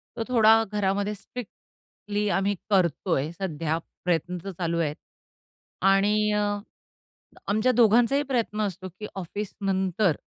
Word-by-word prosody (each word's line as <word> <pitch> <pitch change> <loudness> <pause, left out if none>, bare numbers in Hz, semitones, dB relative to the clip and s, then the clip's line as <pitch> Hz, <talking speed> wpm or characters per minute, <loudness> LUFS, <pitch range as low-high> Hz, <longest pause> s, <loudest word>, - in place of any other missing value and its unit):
तो 230 - -2
थोडा 225 -2 +6
घरामध्ये 205 0 0
स्ट्रिक्टली 210 -1 -7
आम्ही 200 +1 +1
करतोय 170 -5 +1
सध्या 165 -3 -2 0.3
प्रयत्न 180 +1 0
तर 195 - -5
चालू 170 -1 -2
आहेत 150 -2 0 1.0
आणि 210 +2 +3
अ, 210 - +2 1.1
आमच्या 215 +5 +2
दोघांचाही 240 +4 +4
प्रयत्न 235 -5 -1
असतो, 190 -2 -3
की 210 - -5
ऑफिसनंतर 190 -1 -1
200 Hz, 110 wpm, -26 LUFS, 180-215 Hz, 1.1 s, थोडा